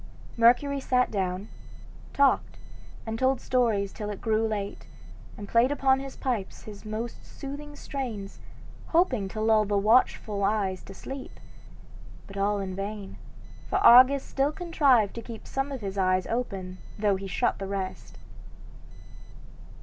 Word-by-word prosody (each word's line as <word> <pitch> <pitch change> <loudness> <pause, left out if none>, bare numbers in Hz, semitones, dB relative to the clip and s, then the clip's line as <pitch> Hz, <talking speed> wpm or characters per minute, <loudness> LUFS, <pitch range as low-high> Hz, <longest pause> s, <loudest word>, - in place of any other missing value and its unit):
Mercury 250 +5 +4
sat 250 -1 +1
down, 190 0 -2 0.6
talked, 280 -1 +2 0.5
and 225 0 -4
told 260 0 +2
stories 220 -6 +1
till 210 -2 -5
it 205 - -5
grew 220 0 +1
late, 205 -2 -4 0.5
and 205 - -8
played 235 +5 +3
upon 265 -2 +3
his 270 0 -7
pipes 235 -7 -3
his 205 -2 -10
most 220 +2 -5
soothing 290 +1 -8
strains, 235 -10 -6 0.5
hoping 270 - +2
to 215 +3 -6
lull 220 0 +4
the 205 -1 0
watchful 210 -1 +2
eyes 195 -2 0
to 195 - -11
sleep, 270 +5 -8 0.9
but 195 - -12
all 200 +1 +1
in 190 -2 -4
vain; 200 0 -6 0.5
for - - +1
Argus 255 +3 +7
still 275 +2 0
contrived 285 - +2
to 230 - -6
keep 230 -1 -9
some 270 +1 -3
of 265 -3 -5
his 195 -1 -4
eyes 185 -1 +2
open 190 -6 -4 0.2
though 205 -2 +2
he 195 +1 -6
shut 180 - 0
the 195 - -4
rest. 195 -1 -5
220 Hz, 145 wpm, -27 LUFS, 200-260 Hz, 0.9 s, Argus